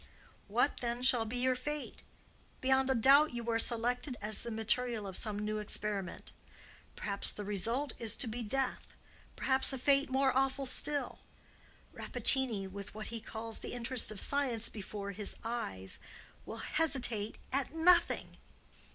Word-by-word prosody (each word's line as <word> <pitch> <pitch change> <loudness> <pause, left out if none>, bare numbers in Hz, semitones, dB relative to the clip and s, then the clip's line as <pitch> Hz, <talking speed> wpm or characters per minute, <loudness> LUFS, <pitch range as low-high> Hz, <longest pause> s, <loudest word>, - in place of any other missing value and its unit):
What, 240 +7 +1
then, 240 0 -3
will 230 -2 -1
be 235 +3 -4
your 255 +1 +2
fate? 295 +4 -6 0.6
Beyond 265 0 +2
a 265 - +2
doubt 275 +4 +5
you 235 -1 -5
are 225 - +1
selected 245 +3 0
as 210 0 +1
the 235 - -5
material 225 0 0
of 190 -2 -7
some 215 -1 -2
new 215 +1 -2
experiment. 205 -3 -3 0.6
Perhaps 200 -1 -2
the 205 - -6
result 230 +7 -1
is 225 -2 +2
to 250 - 0
be 235 +2 -4
death; 260 +4 -2 0.4
perhaps 265 +1 +1
a 265 - -3
fate 275 +2 +2
more 265 0 +2
awful 270 +1 +1
still. 290 +2 +2 0.7
Rappaccini, 235 -8 +2
with 200 +2 -9
what 215 - -6
he 230 -1 -5
calls 225 0 -5
the - - -5
interest 245 0 +2
of 215 -2 -4
science 260 -4 +1
before 200 -1 -6
his 200 +1 -2
eyes, 95 - -4 0.5
will - - -6
hesitate 245 -9 +1 0.2
at 275 0 0
nothing." 340 +2 +3
235 Hz, 150 wpm, -33 LUFS, 215-265 Hz, 0.7 s, doubt